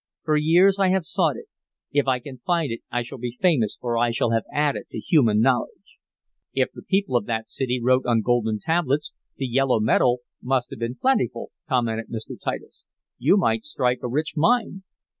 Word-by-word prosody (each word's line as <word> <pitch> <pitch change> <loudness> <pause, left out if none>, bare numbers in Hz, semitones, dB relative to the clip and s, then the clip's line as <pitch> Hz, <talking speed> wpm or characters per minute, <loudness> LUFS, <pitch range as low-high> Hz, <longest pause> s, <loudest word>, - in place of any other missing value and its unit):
"For 155 -1 +1
years 175 +6 +4
I 195 - +4
have 185 -2 +1
sought - - +1
it. - - -9 0.5
If 145 -1 +1
I 130 -1 +3
can 130 0 -10
find 170 -1 0
it 115 - -5
I 120 0 -1
shall 125 +2 -10
be 120 0 -5
famous, 150 - +2
for 120 -2 -1
I 120 0 +3
shall 115 0 0
have 115 -1 +1
added 145 -1 0
to - - -7
human 115 - +3
knowledge." 125 0 -1 0.6
"If 130 -1 +1
the - - -10
people 195 -7 0
of 120 - +1
that 110 -1 -3
city 125 -2 -1
wrote 130 +1 +2
on 115 -2 +3
golden 110 -3 +1
tablets, 155 -2 0 0.2
the 135 - -2
yellow 130 -1 +2
metal 120 +2 +2 0.2
must 130 -1 -1
have - - -8
been 115 +1 -3
plentiful," 130 - 0 0.2
commented 115 -4 0
Mr. 110 -2 -6
Titus. - - -5 0.4
"You 155 +11 +4
might 115 - +1
strike 130 -4 0
a - - -3
rich 150 +6 -2
mine." 210 +3 +1
130 Hz, 195 wpm, -24 LUFS, 120-155 Hz, 0.6 s, years